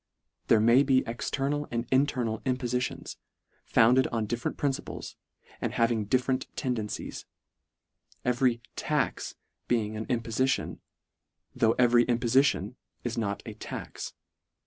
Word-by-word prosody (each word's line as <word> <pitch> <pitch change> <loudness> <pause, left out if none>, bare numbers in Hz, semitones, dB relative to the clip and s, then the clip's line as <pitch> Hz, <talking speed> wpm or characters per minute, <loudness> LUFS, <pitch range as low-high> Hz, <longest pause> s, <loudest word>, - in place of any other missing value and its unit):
There 115 - +6
may 115 +4 +6
be 135 -2 +3
external 140 +5 -2
and 115 0 -2
internal 130 -5 +2
impofiti 125 -1 -1
ons, - - -9 0.5
founded 125 +3 +5
on 115 -2 -1
different 120 +3 -3
principles, 140 -2 -3 0.5
and - - -1
hav 115 0 +3
ing 110 -3 0
different 130 +4 +1
tendencies; 120 -6 -3 1.0
every 125 -1 +2
" - - -47 0.2
tax - - 0 0.2
" - - -52
be 115 -3 +2
ing 105 +1 -6
an 110 +1 -4
impofition, 120 +2 0 0.7
tho' 115 0 +3
every 120 -1 +5
impofition 125 +3 +2 0.3
is 120 - -2
not 100 -4 -2
a - - -6
"tax." - - -7
120 Hz, 130 wpm, -29 LUFS, 115-130 Hz, 1.0 s, There